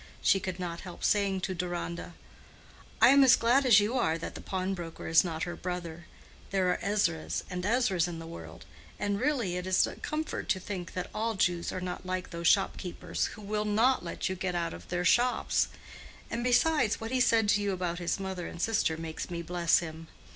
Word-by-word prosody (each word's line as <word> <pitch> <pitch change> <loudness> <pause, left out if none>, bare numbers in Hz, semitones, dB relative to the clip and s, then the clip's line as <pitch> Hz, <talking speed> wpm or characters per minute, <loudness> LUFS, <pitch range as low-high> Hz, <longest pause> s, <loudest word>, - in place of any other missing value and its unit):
She 195 - +4
could 185 -1 -5
not 170 -2 -4
help 180 -2 -9
saying 200 -2 +2
to 185 - -2
Deronda, 175 -1 -4 0.8
"I - - +8
am 275 +1 +7
as 260 - +8
glad 255 +4 +3
as 220 -4 +8
you 205 +3 0
are 160 -7 +1
that 165 - -6
the - - -8
pawnbroker 185 -3 -4
is 160 0 +6
not 165 -3 -3
her 175 - -4
brother: 175 -2 -5 0.4
there 190 -2 +2
are - - -1
Ezras 200 -6 0
and 180 0 -3
Ezras 205 -5 +2
in 170 -2 -5
the 165 - -8
world; 165 +1 -10 0.3
and 205 0 -1
really 245 -11 0
it 180 +1 -4
is 185 0 +4
a - - -7
comfort 310 +1 -4
to 190 - +2
think 185 -2 -6
that 180 -1 -4
all 225 +1 -1
Jews 175 -3 +1
are - - -4
not 180 -1 -5
like 185 0 -4
those 170 -1 -2
shopkeepers 180 -2 +1
who 210 - -11
will 210 +1 -1
not 225 +5 +2
let - - -3
you 190 - -1
get 180 -1 -3
out 170 -1 -1
of 85 0 -11
their 180 0 -2
shops: 245 +6 +3 0.6
and 235 +1 -2
besides, 250 -1 +3
what 225 +1 -5
he 260 - +1
said 230 -3 +4
to 205 0 +3
you 205 -1 0
about 180 -2 -2
his 175 +2 -1
mother 190 -2 -4
and - - -9
sister 210 -5 +1
makes 160 -1 -5
me 170 -1 -4
bless 170 0 +2
him. 160 -1 -8
185 Hz, 210 wpm, -30 LUFS, 175-210 Hz, 0.8 s, I